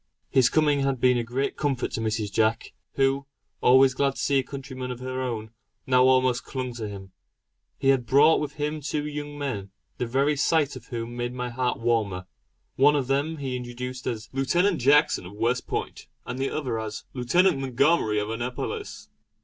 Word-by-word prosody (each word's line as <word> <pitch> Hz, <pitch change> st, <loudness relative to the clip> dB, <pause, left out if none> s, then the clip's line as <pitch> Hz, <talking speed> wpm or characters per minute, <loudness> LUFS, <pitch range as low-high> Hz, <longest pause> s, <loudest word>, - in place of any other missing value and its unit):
His 130 Hz, -2 st, +5 dB
coming 150 Hz, -2 st, +3 dB
had 135 Hz, -2 st, 0 dB
been 125 Hz, 0 st, +4 dB
a -, -, -1 dB
great 125 Hz, +4 st, -2 dB
comfort 140 Hz, -4 st, -1 dB
to -, -, -3 dB
Mrs. 110 Hz, -2 st, -2 dB
Jack, 110 Hz, +3 st, 0 dB, 0.2 s
who, 135 Hz, 0 st, +1 dB, 0.3 s
always 130 Hz, +1 st, +6 dB
glad 135 Hz, +1 st, 0 dB
to -, -, -11 dB
see 140 Hz, -1 st, +2 dB
a -, -, -1 dB
countryman 130 Hz, -2 st, -7 dB
of 125 Hz, -1 st, -5 dB
her 130 Hz, 0 st, -4 dB
own, 115 Hz, -4 st, -4 dB, 0.3 s
now 125 Hz, 0 st, +4 dB
almost 130 Hz, -1 st, +3 dB
clung 130 Hz, -2 st, -4 dB
to 115 Hz, -2 st, -5 dB
him. 95 Hz, -2 st, -9 dB, 0.7 s
He 135 Hz, -, +1 dB
had 130 Hz, -3 st, +2 dB
brought 145 Hz, +6 st, +5 dB
with 150 Hz, -1 st, -4 dB
him 150 Hz, +1 st, -3 dB
two 150 Hz, +1 st, -2 dB
young 145 Hz, 0 st, -5 dB
men, 110 Hz, -9 st, -4 dB, 0.3 s
the 125 Hz, -, -1 dB
very 140 Hz, +5 st, +2 dB
sight 145 Hz, 0 st, +1 dB
of 120 Hz, -3 st, -11 dB
whom 120 Hz, 0 st, -5 dB
made 120 Hz, +1 st, -3 dB
my 125 Hz, -1 st, -3 dB
heart 125 Hz, +1 st, -1 dB
warmer. 110 Hz, -6 st, 0 dB, 0.5 s
One 145 Hz, +2 st, +5 dB
of 140 Hz, -3 st, 0 dB
them 140 Hz, +5 st, 0 dB
he 135 Hz, -3 st, -3 dB
introduced 125 Hz, +1 st, -6 dB
as 115 Hz, -1 st, -3 dB
"Lootenant 175 Hz, +7 st, +2 dB
Jackson 140 Hz, -, +3 dB
of 95 Hz, -, -11 dB
West 115 Hz, +4 st, -1 dB
Point" -, -, -4 dB, 0.2 s
and 130 Hz, -, -5 dB
the 135 Hz, -, 0 dB
other 125 Hz, -7 st, -2 dB
as 110 Hz, -1 st, -5 dB
"Lootenant 155 Hz, +6 st, +2 dB
Montgomery 135 Hz, -3 st, +2 dB
of 105 Hz, +1 st, -1 dB
Annapolis." 125 Hz, -, -5 dB
130 Hz, 190 wpm, -26 LUFS, 120-140 Hz, 0.7 s, always